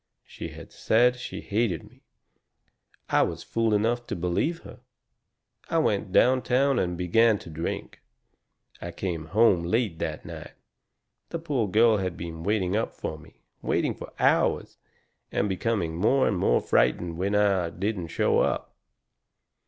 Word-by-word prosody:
She - - -8
had - - -11
said 125 +3 +3
she 125 - -7
hated 105 -5 -1
me. - - -19 1.1
I - - +4
was 85 0 -1
fool 115 -1 0
enough 115 +3 +1
to - - -3
believe 90 - -1
her. 125 - -12 0.9
I 165 - +1
went 105 - +1
downtown 130 +3 +3
and 90 -1 -1
began 110 +5 +3
to 85 - -11
drink. 80 +2 -5 0.8
I 85 - -5
come 85 -4 -4
home 100 -1 +4
late 95 0 -1
that - - -4
night. - - -9 0.8
The 170 - -3
poor 145 -9 -1
girl 110 +3 +4
had 90 -3 -3
been 80 -1 -6
waiting 100 0 0
up 110 - -1
for 80 - -4
me 80 +1 -18 0.2
waiting - - 0
for - - -10
hours, - - +1 0.5
and 100 - 0
becoming 95 -4 -1
more 130 +9 +3
and - - +1
more 90 - +2
frightened 85 +7 +1
when 100 +2 0
I 100 -4 +2
didn't 95 +1 -3
show 85 - +1
up. - - -1
100 Hz, 150 wpm, -26 LUFS, 85-115 Hz, 1.1 s, I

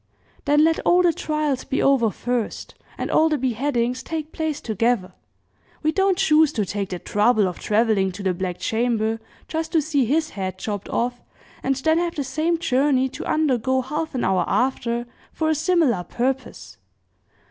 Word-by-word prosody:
"Then 295 +1 +4
let 325 0 +3
all 360 +1 +3
the 345 -2 +4
trials 305 -4 -1
be 270 - -2
over 265 -5 +3
first, 245 +1 -3 0.2
and - - -3
all 320 +1 +4
the 305 - +1
beheadings 250 0 -1
take 315 +1 -5
place 315 -2 -2
together. 220 -4 0 0.7
We 310 - +3
don't 385 +1 +2
choose 315 -5 +4
to 210 - 0
take 200 0 -3
the 180 - -3
trouble 210 +2 +2
of 180 - -5
traveling 210 -3 +2
to 200 +2 -7
the 190 -1 +1
Black 180 0 -3
Chamber 225 0 0 0.3
just 320 0 -3
to 325 - +5
see 290 -3 +1
his 310 +6 0
head 185 -2 -4
chopped 205 0 -5
off, 245 +1 -1 0.4
and 270 +1 0
then 315 +5 +2
have 345 -1 -2
the 285 - -2
same 310 +6 0
journey 265 -3 +2
to - - -7
undergo 260 -4 +1
half 300 +4 -4
an 250 - -1
hour 185 -2 +2
after, 240 -2 0 0.3
for 315 -1 0
a - - +3
similar 310 - +2
purpose. 240 - -3
260 Hz, 175 wpm, -23 LUFS, 220-310 Hz, 0.7 s, to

